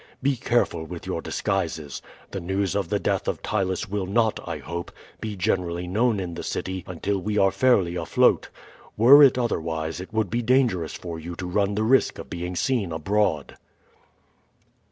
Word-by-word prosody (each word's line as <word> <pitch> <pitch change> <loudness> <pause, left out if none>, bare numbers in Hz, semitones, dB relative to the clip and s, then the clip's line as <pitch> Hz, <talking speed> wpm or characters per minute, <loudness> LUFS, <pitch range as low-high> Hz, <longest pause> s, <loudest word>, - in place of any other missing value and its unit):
Be 140 0 +2
careful 120 -8 0
with 85 +1 -8
your - - -3
disguises. 80 -6 -2 0.3
The 100 - -4
news 95 +1 -1
of - - -1
the - - +1
death - - -1
of - - -2
Ptylus 95 -3 -1
will 95 -1 -3
not, 110 +2 +1
I 85 - -3
hope, 85 +4 -6 0.3
be 110 -2 -4
generally 90 -1 -1
known 110 +4 +1
in 90 -2 -4
the - - -6
city 95 -1 -4
until 95 +3 -2
we 105 +3 -2
are 95 -1 +4
fairly 95 -10 +2
afloat. 85 -2 +2 0.5
Were 130 +7 +8
it 135 -3 +7
otherwise 80 -8 -2
it 95 - -10
would 110 -3 -1
be 120 +1 0
dangerous 120 -9 +1
for 85 -2 -6
you 85 +2 -7
to 90 - -6
run 100 +2 0
the 105 - 0
risk 130 +4 +3
of - - -9
being 90 +1 -4
seen 110 -3 0
abroad." 80 -2 0
95 Hz, 175 wpm, -25 LUFS, 85-110 Hz, 0.5 s, Were